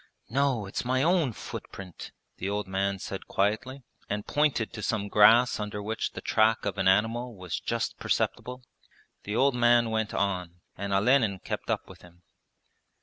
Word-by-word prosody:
'No, 135 -4 +1
it's 100 - -4
my 130 +2 +1
own 165 -5 +3
footprint,' 95 -4 -9 0.3
the 95 - -3
old 105 0 -2
man 95 +1 -1
said 95 0 -7
quietly, 125 +7 -1 0.3
and 105 0 -3
pointed 145 -7 +1
to 110 - -6
some 100 -1 -1
grass 115 +4 +6
under 105 0 -4
which 110 +2 -3
the - - -7
track 110 +1 +2
of 100 -1 -2
an 95 - +2
animal 115 +5 +2
was 90 -3 -4
just - - -3
perceptible. 125 0 -2 0.6
The 105 - -3
old 135 +3 +3
man 120 -1 +4
went 110 -1 -1
on; 90 -3 -2
and 100 +1 -4
Olenin 105 0 +3
kept - - -6
up - - -1
with - - -14
him. 90 0 -18
105 Hz, 165 wpm, -28 LUFS, 100-125 Hz, 0.6 s, grass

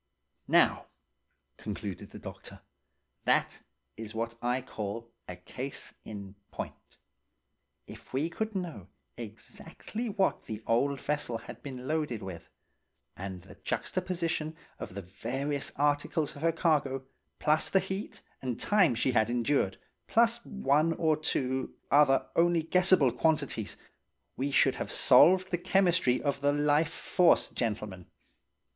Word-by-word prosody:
"Now," - - +4 0.7
concluded 100 -3 -6
the - - -10
doctor, - - -10 0.6
"that - - +2 0.3
is 110 -1 -8
what 115 +1 -2
I 125 +1 +1
call 115 0 -5 0.2
a 90 - -6
case 125 +10 -6
in 100 -2 -8 0.2
point. - - -8 0.9
If - - -13
we 140 +5 0
could 220 +5 -4
know 165 - -4 0.3
exactly 165 - -7
what 195 -2 0
the 110 0 -6
old 135 +4 +2
vessel 145 -5 -1
had 115 - -10
originally 130 -3 -8
been - - -7
loaded 150 -9 -1
with, 85 -4 -8 0.7
and 95 -2 -6
the - - -13
juxtaposition 170 -4 -2 0.2
of 90 - -7
the 100 - -5
various 135 +10 -3
articles 145 +2 +1
of 140 - -10
her 165 +1 +3
cargo, 145 -5 +1 0.3
plus 155 0 +2
the - - +3
heat 190 +2 -5 0.2
and 125 -3 -3
time 190 - +4
she 125 +3 +1
had 110 -2 +3
endured, 120 -4 +1 0.3
plus 235 +1 +3
one 155 -3 +2
or 160 -2 +2
two 130 -4 -2 0.2
other 140 -1 +5
only 170 -1 +3
guessable 180 -5 +4
quantities, 145 -10 0 0.6
we 135 +2 -1
should 140 - +3
have - - -4
solved 185 +1 +6
the 175 - 0
chemistry 180 -8 +3
of 140 -1 -1
the 145 0 +3
life 145 +2 +3
force, 180 +1 +3
gentlemen. 105 -6 -3
140 Hz, 135 wpm, -30 LUFS, 115-165 Hz, 0.9 s, solved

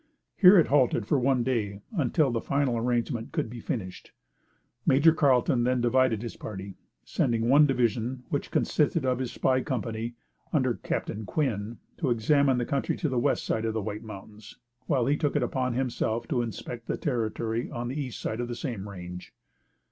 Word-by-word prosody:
Here 195 0 +8
it 170 - +6
halted 130 -6 +2
for 140 - +2
one 125 -1 +2
day 105 -5 -2
until 145 -2 +2
the 115 -1 -1
final 140 -3 0
arrangement 120 0 -1
could 110 - -2
be 120 - -7
finished. 95 -5 -5 0.7
Major 150 +4 +5
Carlton 135 -4 +3
then 125 +1 +2
divided 120 -2 +2
his 120 - -6
party, 100 -2 -7 0.3
sending 115 -1 0
one 145 +4 +6
division, 125 -1 0
which - - -2
consisted - - +1
of 130 -1 +1
his 130 -2 -3
spy 130 0 +1
company, 115 -4 -3 0.4
under - - +2
Captain 110 - -4
Quinn, 110 -2 -2 0.2
to 145 - -1
examine 130 +3 +3
the 120 - 0
country 140 +1 -1
on 155 - +1
the 125 - +1
west - - +1
side 110 - -1
of 110 -1 -1
the 110 - 0
White 105 +1 -4
Mountains, 105 0 -11 0.3
while 130 -6 +2
he 140 +3 +2
took 150 -1 -1
it 145 - +2
upon 125 0 -1
himself 120 -3 -1
to 125 - +1
inspect 115 +1 -6
the - - -1
territory 115 -3 -2
on 120 0 -4
the 135 +4 -3
east 130 -4 -6
side 110 - -3
of 120 - -3
the 120 - -4
same 115 -7 -5
range. 90 -2 -9
120 Hz, 185 wpm, -27 LUFS, 110-130 Hz, 0.7 s, Here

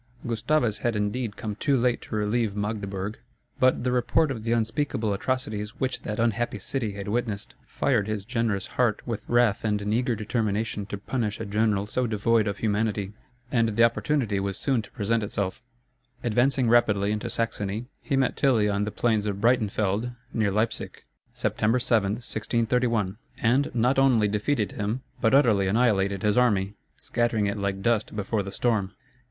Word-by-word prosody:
Gustavus 120 0 +1
had, 120 -2 0
indeed, 105 +1 -2
come 110 -3 -4
too 135 +5 +1
late 125 0 +1
to - - -6
relieve 105 0 0
Magdeburg, 105 -1 -3 0.4
but 130 -2 +3
the 125 - +1
report 135 +5 +2
of 115 -5 -5
the 115 - -1
unspeakable 115 -1 0
atrocities 105 -2 -3
which 130 -1 -1
that 105 - -4
unhappy 115 -1 0
city 110 +1 -3
had 100 0 -6
witnessed, 110 -2 -2
fired 115 -7 +1
his 105 -2 -3
generous 115 -5 -1
heart 120 -4 0
with 115 -3 -3
wrath 120 -4 +3
and 105 -2 +1
an 105 +1 -2
eager 120 +1 +1
determination 105 -1 -2
to 100 - -4
punish 105 0 -2
a 110 - -4
general 105 -1 +1
so 125 +4 0
devoid 110 0 +2
of 100 -1 -2
humanity. 105 -2 -1 0.4
And 115 -2 +3
the 115 - +5
opportunity 115 -1 +1
was 95 -1 -2
soon 130 -5 +1
to 105 - -14
present 115 0 0
itself. 100 -2 -3 0.6
Advancing 125 +2 +2
rapidly 105 -4 +3
into 105 0 -2
Saxony, 110 -1 -2 0.2
he 140 - -1
met 135 -1 +1
Tilly 120 -7 +3
on 100 0 0
the 105 - -3
plains 110 -3 +1
of 100 -1 -2
Breitenfeld, 110 0 +1 0.2
near 110 -3 +1
Leipsic, 110 +4 -2 0.3
September 110 +3 +1
7, 115 -5 +2
1631; 115 -2 0 0.2
and 130 +5 +2
not 125 +3 +3
only 125 -6 +4
defeated 105 +2 0
him, 110 +5 -3 0.2
but 115 +2 +4
utterly 110 -8 +4
annihilated 100 -3 +2
his 105 +2 +3
army, 100 -5 +2 0.2
scattering 120 -3 0
it 100 +1 -1
like 100 -1 -2
dust 115 -3 +1
before 105 +1 -1
the 100 0 -6
storm. 110 -5 0
110 Hz, 170 wpm, -26 LUFS, 105-120 Hz, 0.6 s, the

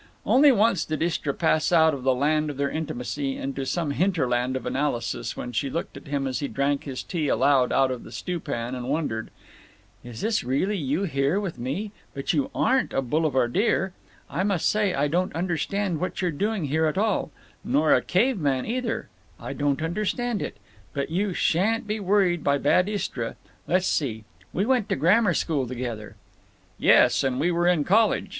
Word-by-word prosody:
Only 280 +2 +6
once 215 -6 +3
did 155 0 -2
Istra 165 -4 -1
pass 160 +2 +1
out 160 -2 +5
of 140 - -4
the 130 0 +2
land 150 +3 +1
of 145 - -6
their 140 0 0
intimacy 140 -2 -3
into 135 0 -4
some 165 -2 -1
hinterland 130 -8 0
of 130 - -4
analysis—when 125 -3 -2
she 135 +4 -1
looked 165 +5 -4
at - - -11
him 140 -1 -1
as 130 -1 -2
he 145 - -2
drank 140 +1 -1
his 135 -3 -5
tea 165 -5 -2
aloud 135 -2 +3
out 135 -1 +3
of 125 - -5
the - - -12
stew 180 -2 -4
pan, 120 -4 -4
and 125 0 -5
wondered: 140 -7 -2 0.7
"Is 120 -2 -8
this 220 0 0
really 140 +12 0
you 150 +1 -1
here 140 +1 +1
with 190 -10 -5
me? 150 - -3 0.2
But 135 - -1
you 275 -1 0
aren't 260 0 +1
a 135 - 0
boulevardier. 155 - +1 0.3
I - - -2
must 195 -4 +1
say 210 -2 +2
I 145 +1 +1
don't 180 +5 -1
understand 175 +1 -1
what 185 - -3
you're 180 -2 0
doing 200 +3 -1
here 160 +3 +1
at 155 - -2
all…. 210 -4 +1 0.3
Nor 150 +4 +3
a - - +4
caveman, 180 - +1
either. 235 0 -2 0.3
I - - -6
don't 145 +1 0
understand 210 +6 -1
it…. - - -5 0.4
But 140 +2 -2
you 190 +1 0
sha'n't 220 +8 +1
be 215 +1 -2
worried 190 -4 +2
by 140 0 +2
bad 180 +7 +3
Istra. 130 - -3 0.3
Let's 185 +1 +2
see; 115 -11 -1 0.3
we 195 - 0
went 245 -4 +1
to 195 - +1
grammar 185 +2 +3
school 145 -6 0
together." 120 -3 -5 0.6
"Yes, - - +5
and 130 -1 0
we 170 +5 +2
were 175 0 +1
in 175 -4 +3
college. 215 +7 +2
155 Hz, 185 wpm, -25 LUFS, 135-195 Hz, 0.7 s, Only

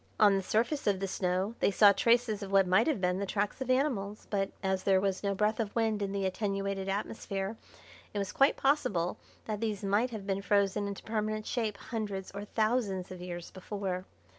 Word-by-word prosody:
On 205 -2 +6
the 195 - +1
surface 230 +9 0
of 200 -2 +2
the 195 - -2
snow 185 +3 -1
they - - +3
saw 200 +1 +7
traces 230 0 +2
of 195 -1 -6
what 195 -1 +5
might 185 - +4
have 305 -9 +1
been 180 0 +1
the 200 - -1
tracks 205 +6 -1
of 260 - -3
animals, 245 -7 0
but, 195 -2 +1
as 190 -1 +1
there 190 -1 +4
was 190 -1 0
no 200 -1 0
breath 210 +3 +1
of 215 -3 -2
wind 220 -2 +1
in 200 -1 -1
the 195 -1 -1
attenuated 195 0 -2
atmosphere, 195 0 -3 0.6
it - - -5
was 200 -1 -2
quite 275 +1 +4
possible 205 - +1 0.3
that 215 -1 -3
these 215 -3 -2
might 205 +5 +2
have 215 -4 -6
been 195 -1 -1
frozen 200 0 +2
into 200 -1 -6
permanent 215 -1 -2
shape 220 -4 -1
hundreds 205 -5 -4
or 200 +1 -6
thousands 215 -4 0
of 185 -1 -8
years 175 -1 -6
before. 185 -1 -4
200 Hz, 205 wpm, -31 LUFS, 195-215 Hz, 0.6 s, saw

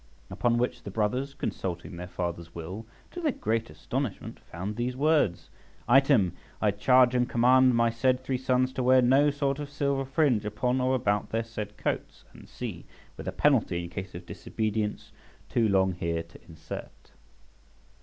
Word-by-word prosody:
Upon 120 -1 +1
which 125 +1 -1
the - - -7
brothers, 125 +7 -1
consulting 85 -1 -4
their 90 +1 -6
father's 85 -2 -5
will, 90 +7 -7 0.2
to 355 - -6
their 310 -3 +2
great 115 - -1
astonishment 130 -6 -4
found 95 +5 -6
these 120 +2 -2
words: 140 - +2 0.4
"Item, 135 - +5 0.3
I 105 - +3
charge 125 +4 +4
and 125 -1 +1
command 125 +1 +5
my 115 0 +3
said 125 +2 +2
three 130 -1 -1
sons 130 0 +1
to 130 - -2
wear 130 0 +5
no 135 +4 +5
sort 140 -1 -1
of 145 -1 -5
silver 140 -1 0
fringe 135 -5 +2
upon 125 +5 0
or 130 +1 +2
about 105 -5 0
their 115 +1 -1
said 105 -2 -7
coats," - - -3 0.2
&c., - - -6 0.3
with - - -9
a - - 0
penalty 85 0 +2
in 85 - -8
case 95 -1 -6
of 85 0 -8
disobedience 110 +1 -3 0.4
too 115 -3 +2
long 95 -1 +3
here 85 -2 -2
to 85 0 -16
insert. 80 -1 -9
115 Hz, 165 wpm, -28 LUFS, 95-130 Hz, 0.4 s, Item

